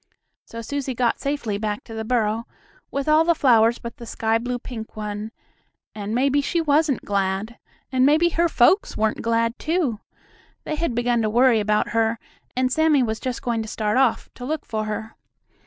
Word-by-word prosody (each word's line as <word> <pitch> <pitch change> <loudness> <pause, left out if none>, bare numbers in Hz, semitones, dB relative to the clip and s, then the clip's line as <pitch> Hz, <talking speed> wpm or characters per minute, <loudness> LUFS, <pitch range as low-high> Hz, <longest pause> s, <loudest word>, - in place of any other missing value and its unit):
So 230 0 -8
Susie 275 +1 -3
got 240 -1 +1
safely 260 -8 -2
back 210 -1 -3
to 225 - -11
the 220 0 -4
burrow, 225 -1 0 0.4
with 280 +1 -3
all 310 +1 +5
the 340 0 +3
flowers 235 -4 +4
but 235 -1 -8
the 235 - -10
sky 225 0 0
blue 245 +1 -3
pink 230 -2 -8
one, 210 0 -4 0.6
and 210 +1 -4
maybe 275 +3 +2
she 340 +4 -1
wasn't 300 -3 +1
glad! 200 +3 -1 0.3
And 255 -1 +2
maybe 310 +5 +4
her 340 +1 +1
folks 325 - +3
weren't 215 0 0
glad 230 +1 0
too! 310 - 0 0.6
They - - -4
had 305 -6 -1
begun 240 0 +1
to 215 - +1
worry 240 +1 +4
about 210 0 +1
her, 225 0 +1 0.4
and 255 0 +1
Sammie 315 -4 +3
was 220 -2 -2
just 255 -2 -4
going 235 -2 0
to 220 - -6
start 215 0 -1
off 260 -3 +2
to 245 - -10
look 300 +3 -3
for 215 -1 -3
her. 215 +1 -5
235 Hz, 190 wpm, -23 LUFS, 220-280 Hz, 0.6 s, all